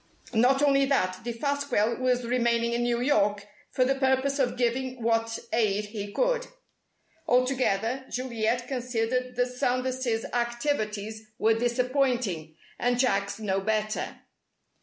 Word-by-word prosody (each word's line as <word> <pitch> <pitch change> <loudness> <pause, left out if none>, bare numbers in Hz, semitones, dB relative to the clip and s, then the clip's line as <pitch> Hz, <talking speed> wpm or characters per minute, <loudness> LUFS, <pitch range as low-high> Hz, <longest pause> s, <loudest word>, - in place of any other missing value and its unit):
Not 255 +5 +4
only 275 -1 +4
that, 185 -10 +1
Defasquelle 240 -2 0
was 250 -1 +1
remaining 235 -1 +1
in 240 - 0
New 240 0 0
York 210 -7 +2 0.2
for 255 - +2
the 270 - +3
purpose 270 +1 +1
of 245 -2 +1
giving 255 +1 -1
what 225 0 +1 0.2
aid 210 -2 +1
he 205 -1 -6
could. - - 0 0.8
Altogether, 255 -1 +1
Juliet 240 -1 -1
considered 250 0 -2
that 245 +1 +2
Sanders' 250 -2 -1
activities 220 -3 -2
were 225 +1 +3
disappointing, 240 - 0 0.2
and 245 0 +1
Jack's 200 -6 +1
no 195 -3 -1
better. 215 +1 -2
240 Hz, 120 wpm, -27 LUFS, 220-255 Hz, 0.8 s, Not